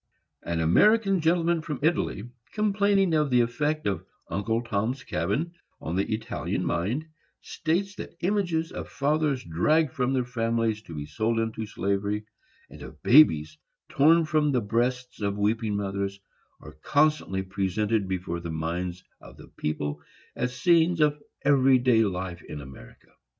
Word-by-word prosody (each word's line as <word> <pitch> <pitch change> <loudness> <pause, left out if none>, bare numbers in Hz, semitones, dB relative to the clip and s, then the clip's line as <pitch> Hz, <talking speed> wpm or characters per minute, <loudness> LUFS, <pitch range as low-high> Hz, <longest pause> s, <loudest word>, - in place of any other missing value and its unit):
An 85 -1 -2
American 195 - +4
gentleman 165 0 +2
from 155 -3 -4
Italy, 155 - 0 0.3
complaining 200 -3 +2
of 150 -2 +2
the 125 -1 +4
effect 150 +6 -1
of 95 -5 -1 0.3
"Uncle 110 +4 -1
Tom's 115 +4 -2
Cabin" 115 - -2 0.3
on 80 - -4
the 95 +3 -1
Italian 110 +2 -2
mind, 105 - -1 0.4
states 180 +5 -2
that - - -8
images 175 -4 0
of - - -7
fathers 140 0 0
dragged 145 - +1
from 125 0 0
their 130 -2 0
families 115 -3 -1
to 85 -7 -10
be 75 -1 -5
sold 110 +10 -1
into 110 -1 -3
slavery, 100 +1 -2 0.4
and - - -13
of - - -11
babes 80 - +5 0.3
torn 160 +4 +4
from 155 -1 +2
the 130 - +2
breasts 125 +4 -1
of 100 0 -1
weeping 105 +1 0
mothers, 100 0 -3 0.4
are 75 0 -13
constantly 145 -10 +1
presented 100 +2 -1
before 90 -2 -3
the 85 0 -6
minds 85 +3 -3 0.2
of - - -14
the - - -14
people 75 -1 -3 0.3
as 125 +1 -3
scenes 170 -1 +4
of 150 -1 +2 0.2
every 135 -2 +5
day 125 -2 +3
life 90 -3 -3
in 75 - -8
America. 65 -3 -13
115 Hz, 150 wpm, -26 LUFS, 95-155 Hz, 0.4 s, babes